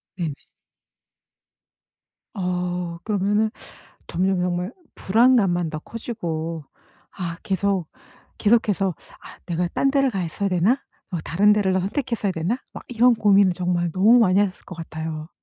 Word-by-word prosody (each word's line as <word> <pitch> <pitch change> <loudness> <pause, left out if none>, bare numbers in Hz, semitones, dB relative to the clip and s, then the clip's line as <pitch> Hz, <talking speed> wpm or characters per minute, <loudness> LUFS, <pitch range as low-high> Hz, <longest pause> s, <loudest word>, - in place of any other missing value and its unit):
네네. 165 -5 -2 2.0
어 180 -2 -2
그러면은 210 +1 +1 0.6
점점 185 +1 0
정말 180 +3 -1 0.2
불안감만 195 -6 +3
더 155 - -4
커지고 165 -8 -5 0.5
아 170 -3 -5
계속, 195 -3 0 0.5
계속해서 205 -4 +2 0.3
'아 - - -13
내가 175 0 -1
딴 275 +9 +1
데를 275 -1 +2
가 195 -5 -2
있어야 175 +4 -2
되나?' 195 +9 +2 0.3
'어 175 - -1
다른 205 +5 +4
데를 205 -2 +2
더 185 - +2
선택했어야 215 0 -2
되나?' 180 +8 -1
막 - - -9
이런 245 0 +4
고민을 200 -3 +4
정말 175 -1 -1
너무 215 +8 +5
많이 195 -4 +4
하셨을 200 -3 -1
것 180 - -10
같아요. 160 -1 -6
190 Hz, 270 characters per minute, -23 LUFS, 175-210 Hz, 2.0 s, 너무